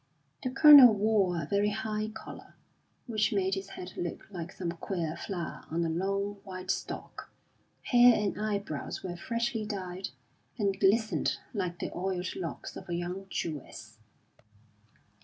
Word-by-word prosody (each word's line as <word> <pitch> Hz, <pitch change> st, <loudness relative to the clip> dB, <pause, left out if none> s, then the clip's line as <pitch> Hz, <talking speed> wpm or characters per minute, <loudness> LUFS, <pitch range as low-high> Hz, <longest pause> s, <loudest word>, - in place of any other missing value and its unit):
The 255 Hz, -, -2 dB
Colonel 270 Hz, -3 st, +9 dB
wore 200 Hz, -4 st, +2 dB
a 160 Hz, -, -3 dB
very 200 Hz, +5 st, +1 dB
high 215 Hz, 0 st, -2 dB
collar, 220 Hz, 0 st, -10 dB, 0.5 s
which 220 Hz, -1 st, +1 dB
made 195 Hz, -2 st, +1 dB
his 195 Hz, 0 st, -3 dB
head 180 Hz, -1 st, -8 dB
look 175 Hz, -1 st, -4 dB
like 175 Hz, -2 st, -6 dB
some 175 Hz, -3 st, -4 dB
queer 170 Hz, -2 st, -3 dB
flower 175 Hz, -1 st, -5 dB
on 170 Hz, +1 st, 0 dB
a -, -, 0 dB
long 195 Hz, +4 st, -1 dB
white 185 Hz, -1 st, -4 dB
stalk; -, -, -6 dB, 0.5 s
hair 245 Hz, -1 st, +6 dB
and 205 Hz, -2 st, 0 dB
eyebrows 200 Hz, -8 st, -3 dB
were 175 Hz, -2 st, -4 dB
freshly 230 Hz, +4 st, -2 dB
dyed, 190 Hz, -3 st, -5 dB, 0.5 s
and 200 Hz, -3 st, 0 dB
glistened 215 Hz, +3 st, +2 dB, 0.2 s
like 180 Hz, -5 st, -2 dB
the -, -, -5 dB
oiled 180 Hz, 0 st, -2 dB
locks 170 Hz, -3 st, -6 dB
of -, -, -9 dB
a 170 Hz, -, -1 dB
young 180 Hz, +3 st, -4 dB
Jewess. 125 Hz, -11 st, -6 dB
195 Hz, 145 wpm, -30 LUFS, 175-215 Hz, 0.5 s, Colonel